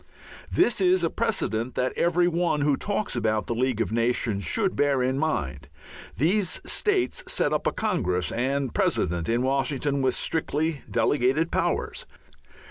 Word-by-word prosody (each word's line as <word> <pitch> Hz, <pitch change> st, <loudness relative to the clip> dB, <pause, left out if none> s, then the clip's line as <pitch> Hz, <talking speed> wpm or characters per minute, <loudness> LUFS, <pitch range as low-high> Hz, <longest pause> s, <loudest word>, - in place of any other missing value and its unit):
This 240 Hz, -, +3 dB
is 185 Hz, -1 st, +3 dB
a 165 Hz, -, +1 dB
precedent 130 Hz, -, -1 dB
that 125 Hz, 0 st, 0 dB
every 175 Hz, +1 st, +2 dB
one 170 Hz, -3 st, 0 dB
who 145 Hz, -1 st, +3 dB
talks 205 Hz, +3 st, -2 dB
about 110 Hz, -2 st, 0 dB
the -, -, -2 dB
League 125 Hz, -1 st, 0 dB
of 115 Hz, -, -1 dB
Nations 115 Hz, -3 st, 0 dB
should 200 Hz, -4 st, 0 dB
bear 140 Hz, -3 st, +2 dB
in 130 Hz, +2 st, 0 dB
mind. 75 Hz, -, -2 dB, 0.5 s
These 180 Hz, -, +1 dB
states 400 Hz, -3 st, 0 dB
set -, -, 0 dB
up -, -, 0 dB
a -, -, +2 dB
congress 90 Hz, -, -1 dB
and 135 Hz, +1 st, -1 dB
president 85 Hz, +2 st, 0 dB
in 120 Hz, +2 st, +1 dB
Washington 140 Hz, +1 st, 0 dB
with 130 Hz, -1 st, +1 dB
strictly 160 Hz, -1 st, -1 dB
delegated 145 Hz, +4 st, +1 dB
powers. -, -, -1 dB
140 Hz, 150 wpm, -25 LUFS, 120-175 Hz, 0.5 s, This